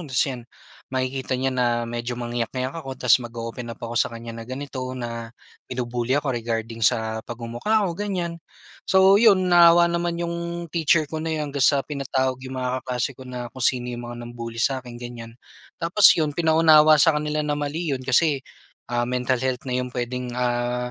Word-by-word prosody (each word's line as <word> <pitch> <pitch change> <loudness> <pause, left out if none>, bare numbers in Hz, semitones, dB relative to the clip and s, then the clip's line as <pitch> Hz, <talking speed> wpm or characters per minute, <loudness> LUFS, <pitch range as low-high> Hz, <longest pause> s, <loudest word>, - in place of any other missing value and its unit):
Tas 130 -1 +2
'yan 125 -4 -6 0.4
makikita 130 0 -2
niya 130 +1 -1
na 125 -1 +1 0.2
medyo 120 +1 -4
mangiyak-iyak 120 +2 -3
ako, 135 -2 -7
ta's 125 0 +4
mag-o-open 120 0 -6
up 115 - -7
ako 115 0 -6
sa 120 - +2
kanya 115 0 -8
na 115 - -7
ganito, 135 +1 -5 0.2
na 115 -2 -5 0.4
binubully 125 0 -1
ako 145 -2 -1
regarding 115 -1 -3
sa 110 0 +1
pagmumukha 120 - -1
ko, 180 - -1
ganyan. 175 -3 -3 0.5
So 190 +1 +6
'yon, 200 -5 +5
naawa 170 0 +7
naman 170 0 -1
'yong 170 0 -4
teacher 160 -1 +3
ko 155 +2 -5
na 165 - -3
yun 155 -3 -2
hanggang 140 - -3
sa 140 0 +4
pinatawag 130 -3 -2
yung 130 0 -7
mga 130 0 -2
kaklase 125 +1 -2
ko 130 0 -12
na 125 -2 -6
kung 130 - -10
sino 125 0 +1
'yong 120 - -5
mga 120 - -7
nang-bully 115 -1 -7
sa 130 +3 +1
akin, 125 -2 -10
ganyan. 120 -1 -9 0.4
Tapos 185 +5 +5
'yon, 155 -2 0
pinaunawa 155 -1 +6
sa 160 +2 +5
kanila 150 0 -1
na 150 - -1
mali 145 +2 -2
'yon 130 - -2
kasi 135 +3 +2 0.5
ah, 120 0 0
mental 125 +1 0
health 130 0 -2
na 125 - 0
yung 125 - -2
puwedeng 125 0 -3
ah 125 0 -1
130 Hz, 185 wpm, -23 LUFS, 120-155 Hz, 0.5 s, naawa